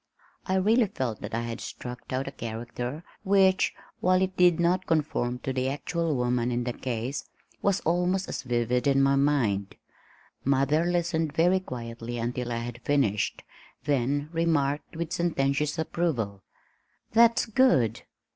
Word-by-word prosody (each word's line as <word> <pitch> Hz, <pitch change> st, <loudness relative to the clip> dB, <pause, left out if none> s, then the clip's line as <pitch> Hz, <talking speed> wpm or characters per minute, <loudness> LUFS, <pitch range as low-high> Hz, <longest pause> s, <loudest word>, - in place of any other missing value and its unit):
I 190 Hz, -, +1 dB
really 220 Hz, +5 st, +4 dB
felt 130 Hz, -, -3 dB
that -, -, -4 dB
I 115 Hz, -, 0 dB
had 115 Hz, 0 st, -5 dB
struck 125 Hz, 0 st, -8 dB
out 130 Hz, +1 st, -1 dB
a -, -, -4 dB
character 120 Hz, +5 st, -5 dB, 0.2 s
which, 190 Hz, -1 st, +3 dB, 0.2 s
while 185 Hz, 0 st, +3 dB
it 190 Hz, 0 st, -2 dB
did 180 Hz, -2 st, +4 dB
not 180 Hz, +2 st, +1 dB
conform 145 Hz, -6 st, 0 dB
to 135 Hz, -, -2 dB
the 130 Hz, 0 st, 0 dB
actual 160 Hz, +3 st, -1 dB
woman 125 Hz, -1 st, 0 dB
in 120 Hz, 0 st, 0 dB
the 120 Hz, 0 st, -2 dB
case, 125 Hz, +2 st, -4 dB, 0.3 s
was 200 Hz, -1 st, +1 dB
almost 180 Hz, +3 st, +1 dB
as -, -, -4 dB
vivid 120 Hz, 0 st, 0 dB
in 135 Hz, 0 st, +4 dB
my 135 Hz, 0 st, +4 dB
mind. 125 Hz, -9 st, +1 dB, 0.7 s
Mother 140 Hz, +4 st, +2 dB
listened 170 Hz, -3 st, 0 dB
very 175 Hz, +4 st, +3 dB
quietly 120 Hz, -6 st, -6 dB
until 120 Hz, +1 st, -3 dB
I 115 Hz, -, -1 dB
had 120 Hz, 0 st, -7 dB
finished, 120 Hz, -9 st, 0 dB, 0.4 s
then 145 Hz, +2 st, 0 dB
remarked 160 Hz, -3 st, 0 dB
with 170 Hz, +1 st, -3 dB
sententious 150 Hz, -2 st, 0 dB
approval. 140 Hz, -, -1 dB, 0.7 s
"That's 230 Hz, +1 st, +5 dB
good. 205 Hz, -, +3 dB
140 Hz, 145 wpm, -27 LUFS, 120-170 Hz, 0.7 s, That's